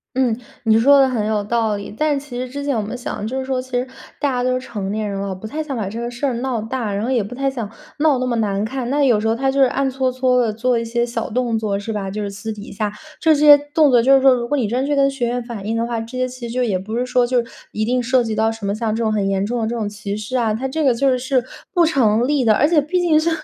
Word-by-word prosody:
嗯， 255 -4 +2 0.3
你 220 -2 +4
说 280 +4 +6
得 270 - +5
很 230 -5 -1
有 215 -1 0
道 220 0 0
理。 200 0 -7
但 300 +1 +1
其 270 -3 -7
实 255 0 -4
之 285 +2 -5
前 280 -2 0
我 220 - 0
们 215 +4 -5
想， 240 -4 -5
就 260 +4 -3
是 260 - -4
说 260 -1 -1
其 260 0 -15
实 250 0 0 0.3
大 285 -2 +1
家 250 -1 -1
都 255 0 +1
是 255 - -11
成 200 -3 -4
年 215 0 -2
人 200 -1 -3
了， 195 -1 -3
不 185 - -10
太 300 +9 -4
想 285 -4 -4
把 210 -4 -2
这 225 +4 -5
个 235 - -3
事 245 +4 -4
儿 265 - +1
闹 245 0 -2
大， 225 0 -3
然 200 +1 -2
后 255 - -1
也 240 -5 +2
不 215 +5 -8
太 275 +1 0
想 235 -6 -5 0.3
闹 300 -3 +3
那 255 - -1
么 245 -1 -1
难 205 -2 0
看， 255 +1 -4
那 285 +2 +2
有 240 -6 +4
时 220 - -1
候 225 - +2
他 270 +3 0
就 275 - -1
是 270 - +7
暗 275 +2 0
搓 260 0 0
搓 255 0 +2
地 230 -3 +1
做 235 +2 0
一 - - -3
些 235 +1 0
小 235 -1 -4
动 240 -1 0
作 210 -2 -1
是 205 +3 -5
吧。 205 -2 -3
就 210 +2 -4
是 200 - -4
私 205 +3 -6
底 210 0 -10
下， 205 +1 -2 0.3
这 320 0 +4
些 295 0 +8 0.2
动 305 -3 +5
作 245 -2 +5
就 270 +3 +5
是 270 - +4
说， 270 -1 +7
如 240 -1 -2
果 290 - 0
你 245 -6 0
真 245 +5 -1
去 290 - +1
跟 275 0 +4
学 260 -3 -2
院 245 +1 -2
反 235 -4 -7
映 225 - -1
的 230 - 0
话， 235 -1 -2
这 230 +3 -7
些 255 0 0
其 250 -1 -8
实 230 - -6
就 250 0 +1
也 200 -6 0
不 215 +5 -5
是 250 - 0
说， 250 -1 +2
就 245 -1 +1 0.3
一 215 - -2
定 250 +2 +1
涉 250 +1 +2
及 225 -2 -3
到 220 +1 +2
什 225 -2 -7
么， 200 - 0
像 215 0 -1
这 230 - -1
种 220 - +1
很 205 -2 0
严 195 0 0
重 240 +2 -2
的 220 - 0
这 235 - -2
种 220 -3 -2
歧 205 -1 -5
视 215 +4 -5
啊， 230 -3 +1
它 250 +5 -2
这 310 +4 -2
个 265 -3 +4
就 265 +1 +2
是 260 0 0 0.3
不 345 -2 +4
成 240 -7 +2
立 285 -2 +1
的。 220 - +5
而 285 - +3
且 325 -1 +4
毕 310 +6 -1
竟 325 -3 +4
是， 325 +2 +1
240 Hz, 350 characters per minute, -20 LUFS, 220-265 Hz, 0.3 s, 些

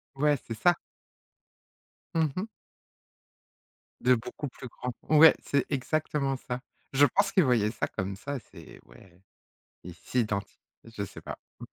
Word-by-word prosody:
Ouais, 145 +1 +3
c'est 115 - -4
ça. 175 -1 +4 1.4
Mmh 160 -3 +2
mh. 195 +5 -2 1.5
De 125 0 +5
beaucoup 125 +5 -5
plus 125 0 -9
grand. 125 +1 -5 0.2
Ouais, 155 +1 +9
c'est 140 - +1
exactement 140 0 0
ça. 125 -1 -5 0.3
Je 145 +2 +7
pense 195 +8 +2
qu'il 185 - +5
voyait 115 -5 +3
ça 115 - -2
comme 95 -1 -4
ça, 140 +7 -4
c'est - - -12
ouais. 90 -2 -18 0.7
Il 90 -2 -8
s'identi 105 0 -2 0.3
je 115 -3 -5
sais - - -10
pas. - - -6 0.2
Mmh. - - -6
130 Hz, 145 wpm, -29 LUFS, 115-150 Hz, 1.5 s, Ouais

